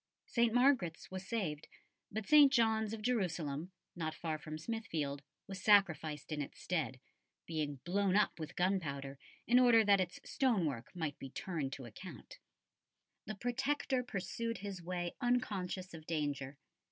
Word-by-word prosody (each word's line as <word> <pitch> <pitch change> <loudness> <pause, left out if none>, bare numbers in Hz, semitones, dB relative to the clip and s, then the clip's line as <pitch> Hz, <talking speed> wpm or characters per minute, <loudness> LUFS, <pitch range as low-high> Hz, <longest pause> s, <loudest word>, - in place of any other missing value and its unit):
St. 235 -1 +2
Margaret's 245 - +2
was 185 0 -6
saved, 180 -10 -2 0.4
but 215 0 -3
St. 295 -2 +8
John's 220 -3 +3
of 220 -1 -5
Jerusalem, 175 - -1 0.2
not 160 -2 -3
far 160 -2 -3
from 155 0 -6
Smithfield, 160 -8 -3 0.2
was 195 -1 -7
sacrificed 165 -8 +3
in 150 -1 -1
its 140 - -7
stead, 145 -8 -2 0.5
being 155 -3 -2
blown 195 +1 +2
up 210 -4 +3
with 155 -1 -6
gunpowder 140 -7 -1 0.3
in 245 +2 +6
order 240 -3 +7
that 200 -1 +5
its 180 -1 -3
stone 235 -10 +2
work 130 -6 -3
might 160 -5 -3
be 135 - -7
turned 145 -1 -3
to 135 - -7
account. 120 - -10 0.9
The 215 - -4
Protector 260 +3 0
pursued 230 +1 -3
his 195 -2 -6
way 175 0 -3
unconscious 200 -7 -1
of 160 -1 -10
danger. 145 -4 -2
185 Hz, 150 wpm, -35 LUFS, 155-220 Hz, 0.9 s, St